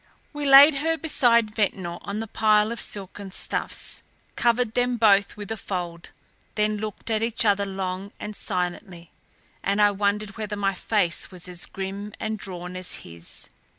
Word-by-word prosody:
We 295 -1 -3
laid 275 +3 +10
her 325 +3 0
beside 235 -8 +3
Ventnor 190 -5 -1
on 200 +1 -4
the - - -3
pile 215 0 +3
of 235 - -3
silken 200 0 -5
stuffs, 185 - -3 0.3
covered 235 -1 +2
them 245 0 +1
both 200 -3 +4
with 205 0 -7
a 225 - -2
fold, 175 -4 -5 0.5
then 210 0 +1
looked 215 +1 -5
at 220 -1 +1
each 230 +1 +1
other 200 -1 +3
long 190 0 -4
and 210 0 -6
silently 180 -2 -3 0.5
and 200 +1 0
I 205 0 +6
wondered 200 +1 -1
whether 215 -1 -3
my 200 -1 0
face 185 -2 0
was 180 -2 -9
as 175 -1 -6
grim 195 +2 -6
and 215 -1 -3
drawn 180 -2 -5
as 185 0 -1
his. 85 0 -8
205 Hz, 165 wpm, -25 LUFS, 190-220 Hz, 0.5 s, laid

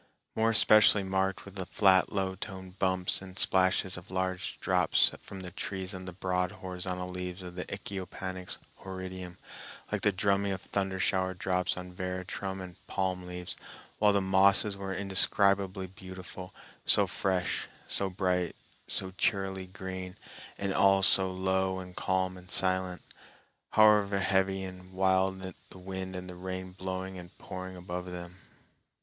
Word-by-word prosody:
More 110 +1 +3
especially 110 -2 +6
marked 95 0 -1
were 100 - -10
the 95 -1 -4
flat 95 -3 +4
low 95 -2 -1
toned 95 -1 -8
bumps 95 -1 +1
and 95 -1 -11
splashes 95 -1 +3
of 90 +3 -11
large 95 +2 -2
drops 90 -3 +3
from 95 -1 -9
the 90 -1 -7
trees 95 0 -5
on 95 -1 -7
the 90 - -6
broad 90 0 -1
horizontal 90 0 -5
leaves 90 0 -5
of 90 -1 -8
Echinopanax 95 -2 -5 0.2
horridum, 95 -1 -7 0.5
like - - -1
the 105 - +3
drumming 100 0 +1
of 95 - -5
thundershower 95 -1 0
drops 90 -1 0
on 90 0 -7
veratrum 95 +1 -4
and 90 -2 -9
palm 90 -1 -2
leaves, 90 0 -5 0.4
while 105 -1 +5
the 100 -1 +2
mosses 95 +2 +5
were 100 -1 -5
indescribably 95 0 +2
beautiful, 95 0 -9 0.3
so - - +9
fresh, 95 -2 -1 0.2
so 100 - 0
bright, 90 -2 0 0.3
so 95 -1 +1
cheerily 95 -2 0
green, 95 -1 -7 0.4
and 100 -1 -1
all 95 0 +4
so 95 0 +5
low 95 0 0
and 90 -1 -8
calm 95 0 0
and 90 0 -14
silent, 95 -1 +2 0.7
however 105 -2 +5
heavy 95 0 +1
and 95 0 -9
wild 95 0 +1 0.2
the - - -12
wind 95 0 -6
and 90 0 -6
the 90 - -7
rain 95 +1 -5
blowing 95 0 -5
and 90 0 -12
pouring 95 -1 -7
above 90 0 -5
them. 90 0 -8
95 Hz, 145 wpm, -30 LUFS, 90-95 Hz, 0.7 s, so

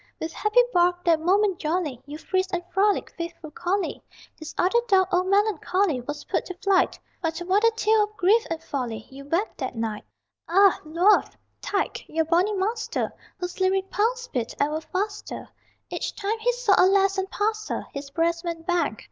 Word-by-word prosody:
With 320 0 -4
happy 425 +4 +4
bark, 355 0 +2
that 330 -2 +4
moment 385 +3 +2
jolly, 310 -5 -2
You 295 +1 -7
frisked 375 +3 -1
and 350 - -3
frolicked, 400 +2 +1
faithful 335 -2 -6
collie; 370 +6 -2 0.3
His 315 -1 -8
other 380 +7 +3
dog, 380 -3 +4
old 365 +1 +2
melancholy, 395 - +1
Was 295 +4 -6
put - - -1
to 365 - -6
flight 385 0 +2 0.2
But 325 -2 -2
what 370 +4 +1
a 460 - +6
tale 435 -1 +3
of 420 0 -20
grief 420 +6 +4
and 325 -1 -4
folly 235 -6 -4
You 275 +1 -10
wagged 340 +9 -1
that 260 -3 -3
night! 225 -2 -3 0.5
Ah, 390 +2 +5
Luath, 345 +7 +3 0.2
tyke, 395 - -2
your 320 0 0
bonny 355 +6 +2
master 440 +4 -2 0.2
Whose 360 0 -5
lyric 380 +1 +1
pulse 480 +3 0
beat 240 -3 -3
ever 300 +2 0
faster 400 +6 -4 0.4
Each - - -3
time 425 +2 -2
he 480 +2 +2
saw 485 -4 +2
a - - +6
lass 390 0 +3
and 385 0 -2
passed 430 +2 -1
her - - -3
His 280 0 -6
breast 335 +3 0
went 335 -2 -5
bang! 340 -10 0
365 Hz, 180 wpm, -25 LUFS, 320-405 Hz, 0.5 s, a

